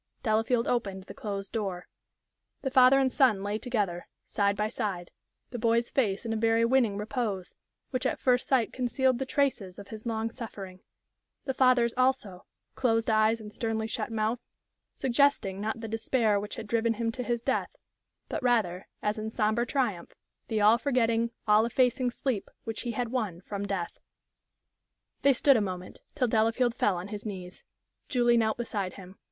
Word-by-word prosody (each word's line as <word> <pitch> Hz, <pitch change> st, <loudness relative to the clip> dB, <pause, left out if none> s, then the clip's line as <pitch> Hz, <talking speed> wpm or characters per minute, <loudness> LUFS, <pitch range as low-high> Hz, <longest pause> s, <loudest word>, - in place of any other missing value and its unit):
Delafield 225 Hz, +1 st, +2 dB
opened 195 Hz, -6 st, -1 dB
the -, -, -10 dB
closed 200 Hz, -2 st, -5 dB
door. 195 Hz, -6 st, -3 dB, 0.8 s
The 265 Hz, -, -1 dB
father 260 Hz, 0 st, +7 dB
and 265 Hz, -1 st, +2 dB
son 235 Hz, -9 st, +3 dB
lay 205 Hz, +1 st, -2 dB
together, 205 Hz, -9 st, -2 dB, 0.2 s
side 200 Hz, 0 st, 0 dB
by 210 Hz, +1 st, +1 dB
side, 200 Hz, -6 st, -4 dB, 0.4 s
the 245 Hz, -, -5 dB
boy's 230 Hz, +1 st, +1 dB
face 210 Hz, -6 st, 0 dB
in 225 Hz, -, -1 dB
a -, -, -1 dB
very 225 Hz, +1 st, +3 dB
winning 235 Hz, -5 st, +2 dB
repose, 210 Hz, -3 st, -3 dB, 0.4 s
which 255 Hz, 0 st, 0 dB
at -, -, -1 dB
first 250 Hz, -1 st, +2 dB
sight 255 Hz, -4 st, +2 dB
concealed 255 Hz, 0 st, +1 dB
the 265 Hz, -, -3 dB
traces 255 Hz, -11 st, 0 dB
of 200 Hz, -1 st, -10 dB
his 220 Hz, +1 st, -8 dB
long 225 Hz, 0 st, -1 dB
suffering; 195 Hz, -6 st, -8 dB, 0.7 s
the 265 Hz, -, -1 dB
father's 250 Hz, -3 st, +4 dB
also 255 Hz, -8 st, 0 dB, 0.3 s
closed 225 Hz, -2 st, +1 dB
eyes 220 Hz, +1 st, +3 dB
and 210 Hz, -1 st, -10 dB
sternly 225 Hz, -1 st, -2 dB
shut 225 Hz, -, -3 dB
mouth 220 Hz, +2 st, 0 dB, 0.6 s
suggesting, 240 Hz, -7 st, +2 dB
not 220 Hz, +1 st, -3 dB
the 225 Hz, -, -5 dB
despair 225 Hz, -1 st, +1 dB
which 205 Hz, 0 st, -6 dB
had -, -, -6 dB
driven 230 Hz, +1 st, +1 dB
him 230 Hz, +1 st, -1 dB
to 250 Hz, -, -5 dB
his 240 Hz, -1 st, -2 dB
death, -, -, -1 dB, 0.5 s
but, -, -, -3 dB
rather, 215 Hz, -8 st, +1 dB, 0.2 s
as 210 Hz, +1 st, 0 dB
in 215 Hz, 0 st, -3 dB
sombre 220 Hz, +2 st, 0 dB
triumph, 230 Hz, -12 st, -2 dB, 0.3 s
the 220 Hz, -, -1 dB
all 215 Hz, +3 st, +5 dB
forgetting, 235 Hz, -4 st, +1 dB, 0.2 s
all 210 Hz, +1 st, +6 dB
effacing 250 Hz, +1 st, +2 dB
sleep 245 Hz, -3 st, -3 dB
which 225 Hz, -1 st, -5 dB
he 240 Hz, -2 st, -3 dB
had 245 Hz, +1 st, -2 dB
won 215 Hz, -9 st, -2 dB
from 200 Hz, +1 st, -5 dB
death. 185 Hz, -3 st, -3 dB, 1.2 s
They 275 Hz, -, +5 dB
stood 270 Hz, +1 st, +5 dB
a -, -, +1 dB
moment, 185 Hz, -2 st, -5 dB
till 255 Hz, -4 st, +1 dB
Delafield 230 Hz, +2 st, +2 dB
fell 205 Hz, -5 st, +1 dB
on 180 Hz, +3 st, -6 dB
his 210 Hz, -1 st, -6 dB
knees. 185 Hz, -4 st, -7 dB, 0.5 s
Julie 240 Hz, -2 st, +3 dB
knelt 220 Hz, -1 st, +1 dB
beside 205 Hz, -6 st, -3 dB
him. 190 Hz, 0 st, -12 dB
225 Hz, 175 wpm, -29 LUFS, 205-245 Hz, 1.2 s, father